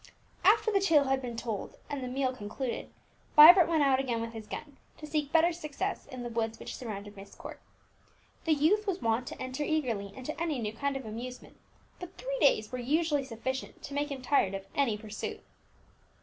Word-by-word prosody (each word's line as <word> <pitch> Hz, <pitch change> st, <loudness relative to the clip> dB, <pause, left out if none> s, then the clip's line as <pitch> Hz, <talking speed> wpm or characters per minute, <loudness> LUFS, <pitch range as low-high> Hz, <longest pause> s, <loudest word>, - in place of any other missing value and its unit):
'" -, -, -35 dB
After 440 Hz, +2 st, +5 dB
the 400 Hz, -, +3 dB
tale 330 Hz, -7 st, +4 dB
had 270 Hz, -1 st, 0 dB
been 240 Hz, -3 st, -5 dB
told, 225 Hz, -3 st, -4 dB
and 285 Hz, -2 st, -4 dB
the -, -, -3 dB
meal 260 Hz, 0 st, -1 dB
concluded, 235 Hz, +3 st, -4 dB, 0.5 s
Vibert 335 Hz, +3 st, +10 dB
went 320 Hz, -3 st, +2 dB
out 270 Hz, -2 st, +4 dB
again 245 Hz, -4 st, -1 dB
with 230 Hz, 0 st, -4 dB
his 220 Hz, -2 st, -8 dB
gun, 290 Hz, -2 st, -7 dB, 0.2 s
to 305 Hz, -, -8 dB
seek 300 Hz, -2 st, -2 dB
better 330 Hz, +1 st, +4 dB
success 335 Hz, +4 st, -4 dB
in 255 Hz, -3 st, -7 dB
the 240 Hz, -, -4 dB
woods 225 Hz, -1 st, -2 dB
which -, -, -7 dB
surrounded 205 Hz, -4 st, -7 dB
Myst 195 Hz, 0 st, -12 dB
Court. -, -, -9 dB, 0.9 s
The 325 Hz, -, +4 dB
youth 370 Hz, +9 st, +2 dB
was 385 Hz, -1 st, 0 dB
wont 230 Hz, -1 st, 0 dB
to -, -, -7 dB
enter 260 Hz, +3 st, -3 dB
eagerly 240 Hz, -11 st, -1 dB
into 260 Hz, +4 st, -5 dB
any 320 Hz, -4 st, 0 dB
new 215 Hz, -3 st, -3 dB
kind 275 Hz, +4 st, -1 dB
of 265 Hz, -, -8 dB
amusement, 240 Hz, +4 st, -7 dB, 0.4 s
but 360 Hz, +1 st, -9 dB
three -, -, -3 dB
days 215 Hz, 0 st, +3 dB
were 255 Hz, -, -4 dB
usually 295 Hz, +3 st, +1 dB
sufficient 260 Hz, +2 st, -5 dB
to -, -, -7 dB
make 290 Hz, +1 st, -1 dB
him 270 Hz, -3 st, -6 dB
tired 205 Hz, -8 st, +2 dB
of 195 Hz, 0 st, -6 dB
any 250 Hz, -7 st, +1 dB
pursuit. 215 Hz, 0 st, -6 dB
265 Hz, 205 wpm, -30 LUFS, 230-310 Hz, 0.9 s, Vibert